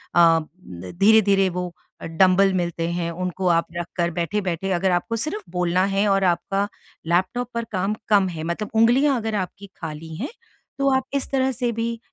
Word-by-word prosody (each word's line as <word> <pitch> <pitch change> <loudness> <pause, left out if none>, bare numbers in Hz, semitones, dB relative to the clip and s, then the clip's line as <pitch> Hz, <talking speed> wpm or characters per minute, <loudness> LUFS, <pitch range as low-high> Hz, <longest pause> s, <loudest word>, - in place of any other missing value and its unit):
अ, 165 -1 +6 0.2
धीरे-धीरे 195 - +2
वो 180 0 -4 0.3
डंबल 185 +3 +3
मिलते 170 -2 -1
हैं 170 -1 -2
उनको 180 +1 -3
आप 170 -1 +3
रख 175 0 -3
कर 170 0 +1
बैठे-बैठे 185 +1 -2
अगर 185 +2 +1
आपको 180 +6 0
सिर्फ़ 310 - -3
बोलना 180 +1 +1
है 205 +1 +2
और 195 0 +2
आपका 195 +3 0 0.4
लैपटॉप 190 +8 0
पर 235 0 -2
काम 195 +2 -1
कम 200 -2 +4
है 160 -3 -6
मतलब 170 +6 -3
उँगलियाँ 255 +5 +4
अगर 220 -2 -2
आपकी 190 +1 -4
खाली 160 0 -7
हैं, 225 - -4 0.5
तो 275 0 +2
आप 265 - +1
इस 280 -1 -1
तरह 265 -1 +2
से 245 -1 -1
भी 230 0 -3
190 Hz, 175 wpm, -23 LUFS, 170-220 Hz, 0.5 s, अ